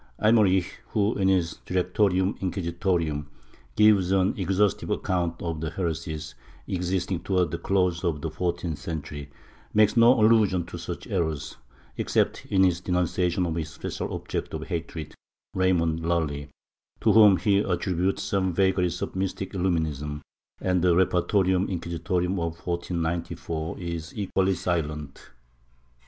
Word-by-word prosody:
Eymerich 100 -5 +3 0.2
who, 105 +2 +2
in 95 -1 +1
his 90 -4 +1
Directorium 95 +1 +1
Inquisitorum, 85 -5 -1 0.5
gives 105 -4 +5
an 95 0 +3
exhaustive 95 +1 +1
account 85 -2 -1
of 80 -2 -3
heresies 80 -2 -3 0.3
existing 90 0 -1
towards 90 -1 0
the 85 - -3
close 90 -3 +1
of 85 -4 0
the 80 - -3
fourteenth 85 -1 -2
century, 75 -3 -6 0.5
makes 105 -1 +5
no 120 +1 +6
allusion 105 -5 +4
to 85 0 -8
such 85 +1 -6
errors, 80 -8 -2 0.4
except - - 0
in 95 -1 +3
his 90 -2 +2
denunciation 90 0 0
of 85 - -2
his 80 -2 -3
special - - -5
object - - -4
of - - -5
hatred 80 -2 -5 0.4
Raymond 85 -3 +2
Lully, 80 -4 -1 0.5
to - - +4
whom 105 -4 +7
he 100 -1 +2
attributes 95 -1 0
some 95 -2 0
vagaries 90 -2 +1
of - - -5
mystic 95 +1 -3
illuminism, 80 -6 -1 0.4
and 90 -1 +1
the 90 -1 +4
Repertormm 95 +1 +2
Inquisitorum 90 +1 -1
of 85 0 -3
1494 85 -2 -3
is 85 -1 -6
equally 95 -1 +1
silent. 75 -5 -3
90 Hz, 130 wpm, -26 LUFS, 85-95 Hz, 0.5 s, whom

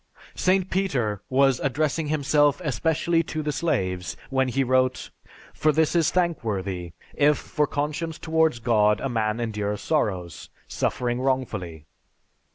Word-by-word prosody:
St. 185 0 +1
Peter 125 - 0
was 135 -1 +3
addressing 150 +3 -1
himself 145 0 +2
especially 160 +4 +1
to 155 0 -4
the 150 - -1
slaves 95 - -2
when 130 0 +2
he 135 +2 0
wrote, 130 0 +1 0.4
"For 155 - +2
this 160 +2 +1
is 165 -3 +3
thankworthy, 100 - -2 0.2
if 150 0 +3
for 150 -1 -1
conscience 150 +3 -3
towards 160 -4 +1
God 110 -3 +2
a 135 - -2
man 110 -2 -1
endures 105 -3 -2
sorrows, 95 - -2 0.2
suffering 120 0 -1
wrongfully." 105 - -2
130 Hz, 130 wpm, -25 LUFS, 110-155 Hz, 0.4 s, was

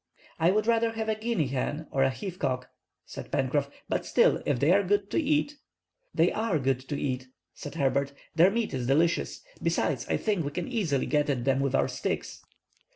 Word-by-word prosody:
"I 165 - +4
would 210 +3 +2
rather 230 0 +2
have 220 -1 -3
a - - +3
guinea 220 -6 0
hen, 145 +4 -2
or 135 - +1
a 135 - +4
heath 180 +7 -6
cock," 130 -2 -2 0.3
said - - -9
Pencroff, 140 +2 0 0.2
"but - - -1
still, - - +3
if 140 -4 +1
they 145 +6 +4
are 200 +2 +5
good 200 +1 0
to - - +2
eat"— 295 0 +1 0.5
"They - - +3
are 220 -7 0
good 135 -2 +1
to 145 - -2
eat," 130 -2 -2 0.3
said - - -8
Herbert; 140 0 +1 0.2
"their 170 +3 +6
meat 225 -1 -1
is 125 -2 -2
delicious. 160 +5 +1 0.2
Besides, - - 0
I - - +2
think 205 -6 0
we 145 - -2
can 145 - -4
easily 195 - 0
get 150 -1 +1
at 125 -4 -1
them 135 -1 +2
with 135 -1 +1
our - - +3
sticks." - - -4
155 Hz, 205 wpm, -28 LUFS, 135-215 Hz, 0.5 s, their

